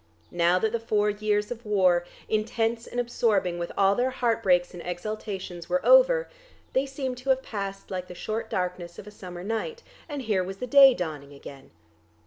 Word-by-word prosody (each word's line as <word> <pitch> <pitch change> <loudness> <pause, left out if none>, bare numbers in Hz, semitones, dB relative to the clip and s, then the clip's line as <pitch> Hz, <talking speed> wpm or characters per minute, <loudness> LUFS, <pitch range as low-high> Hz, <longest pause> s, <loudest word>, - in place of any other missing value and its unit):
Now 175 +1 +3
that 220 +3 0
the 235 - -1
four 210 -2 +1
years 210 0 -1
of 240 -1 -6
war, 185 -4 +2 0.2
intense 225 +1 -1
and 245 - -4
absorbing 205 -7 +1
with 170 - -4
all 195 0 +4
their 245 +5 +1
heart 235 -3 0
breaks 180 -3 +2
and 175 - -8
exultations, 185 -1 -5
were 275 - 0
over, - - +6 0.5
they 265 +1 +1
seemed 265 -2 -4
to 260 +2 -6
have 265 0 +3
passed 195 -2 -6
like 185 -1 -4
the 180 - -10
short 220 +4 -4
darkness 180 -1 -3
of - - -9
a 210 - -10
summer 180 -3 -9
night, 225 - -3 0.3
and 290 -3 -4
here 205 -5 +1
was 190 +1 -6
day 270 +3 +7
dawning 150 -6 -5
again. 140 -1 -12
210 Hz, 185 wpm, -26 LUFS, 180-240 Hz, 0.5 s, day